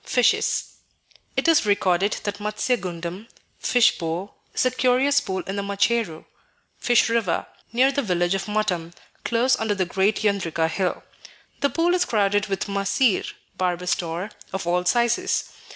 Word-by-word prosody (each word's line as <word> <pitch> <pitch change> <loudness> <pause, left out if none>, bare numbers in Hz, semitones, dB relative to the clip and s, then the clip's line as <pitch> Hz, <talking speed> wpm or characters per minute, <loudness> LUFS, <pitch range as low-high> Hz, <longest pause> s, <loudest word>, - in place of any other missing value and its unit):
Fishes 250 -2 +1 0.6
It - - +1
is 330 -1 +5
recorded 200 -1 +2
that 205 0 -4
"Matsya 210 +4 0
gundam 180 0 -6 0.3
(fish 240 -1 +3
pool) 170 +4 -4 0.2
is - - 0
a 255 - +3
curious 255 +3 +3
pool 190 -2 -3
in 195 +1 -5
the - - 0
Macheru 200 -3 0 0.5
(fish 240 -2 +3
river) 230 -6 0 0.3
near 255 +4 +4
the 280 - 0
village 175 -5 0
of 195 +1 -2
Matam, 180 -6 -1 0.3
close 240 +3 +2
under 220 -2 0
the 190 -2 0
great 195 +5 0
Yendrika 175 -6 +1
hill. 185 0 -1 0.6
The 280 - +2
pool 335 +6 +1
is 360 0 +2
crowded 205 -1 +1
with 195 -1 -2
mahseer 200 +3 +1 0.3
(Barbus 180 -1 0
tor) 175 +3 -4 0.2
of 190 -2 -4
all 180 +1 0
sizes. 240 - +1
200 Hz, 150 wpm, -23 LUFS, 180-235 Hz, 0.6 s, is